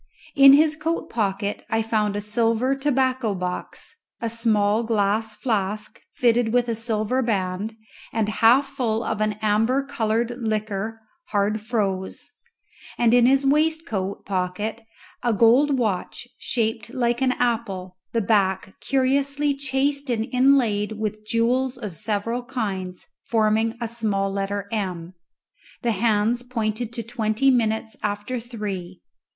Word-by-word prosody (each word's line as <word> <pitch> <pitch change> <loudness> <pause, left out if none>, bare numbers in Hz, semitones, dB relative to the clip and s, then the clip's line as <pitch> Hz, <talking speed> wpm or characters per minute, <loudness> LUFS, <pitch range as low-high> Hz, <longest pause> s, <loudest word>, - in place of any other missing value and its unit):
In 275 -1 +9
his 310 +2 +5
coat 320 +2 -3
pocket 200 -2 -1
I 225 0 +1
found 215 -2 0
a 205 - -2
silver 230 +4 +1
tobacco 260 -5 0
box, 180 - -5 0.2
a 230 -1 -2
small 220 -2 +2
glass 220 -1 0
flask 210 -3 -2
fitted 235 -2 +2
with 245 0 +2
a 230 - 0
silver 225 +2 -1
band 205 -2 -2 0.4
and 225 -2 0
half 230 +5 +4
full 240 -5 -1
of 220 -1 -2
an 215 0 +1
amber 225 +6 +2
coloured 230 -2 -1
liquor, 215 0 -2 0.3
hard 205 +1 0
froze; 200 -4 -2 0.7
and 235 -1 +3
in 245 0 +6
his 275 +1 +3
waistcoat 295 - 0
pocket 195 +4 -2 0.4
a 240 -2 +1
gold 255 +6 +4
watch, 215 -7 -2
shaped 225 -1 -1
like 240 -1 0
an 260 -1 +3
apple, 200 -8 -2 0.2
the 230 - +1
back 190 -2 +1
curiously 275 +5 +1
chased 280 +1 -1
and 225 -2 0
inlaid 245 -6 +3
with 215 0 -4
jewels 250 +3 +1
of 210 -7 -6
several 215 +7 -2
kinds, 190 -7 -4 0.2
forming 220 +1 +1
a 235 - -2
small 210 -4 0
letter 200 0 -2
M. 185 -5 -3 0.7
The 235 - +2
hands 220 +2 +1
pointed 230 -2 -3
to 235 -1 -4
twenty 230 +3 +1
minutes 220 -2 0
after 205 +5 -2
three. 205 -6 -6
225 Hz, 135 wpm, -23 LUFS, 205-245 Hz, 0.7 s, In